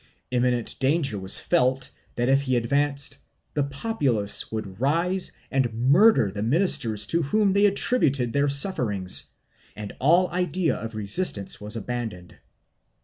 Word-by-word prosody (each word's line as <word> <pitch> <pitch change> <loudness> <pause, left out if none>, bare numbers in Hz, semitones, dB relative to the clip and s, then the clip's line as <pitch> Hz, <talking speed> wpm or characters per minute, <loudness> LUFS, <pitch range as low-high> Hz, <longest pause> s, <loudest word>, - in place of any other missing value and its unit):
Imminent 125 -2 -1
danger 135 -6 0
was 95 0 +6
felt 135 -6 0 0.2
that 120 0 -1
if 135 +1 +3
he 130 -2 -1
advanced 140 +3 -1 0.3
the 145 - 0
populace 140 - 0
would 105 -3 -6
rise 170 +7 +1 0.2
and 130 -4 0
murder 135 - +3
the 100 +1 -6
ministers 120 - +1
to 165 +10 0
whom 195 +6 +1
they 200 +1 +4
attributed 150 - 0
their 140 0 +1
sufferings, 120 - 0 0.5
and 105 -1 -8
all 170 +7 +3
idea 180 -1 -1
of 115 0 -7
resist 110 - +1
ance 100 0 -4
was 105 +2 +1
abandoned. 110 -6 -6
135 Hz, 140 wpm, -24 LUFS, 110-165 Hz, 0.5 s, was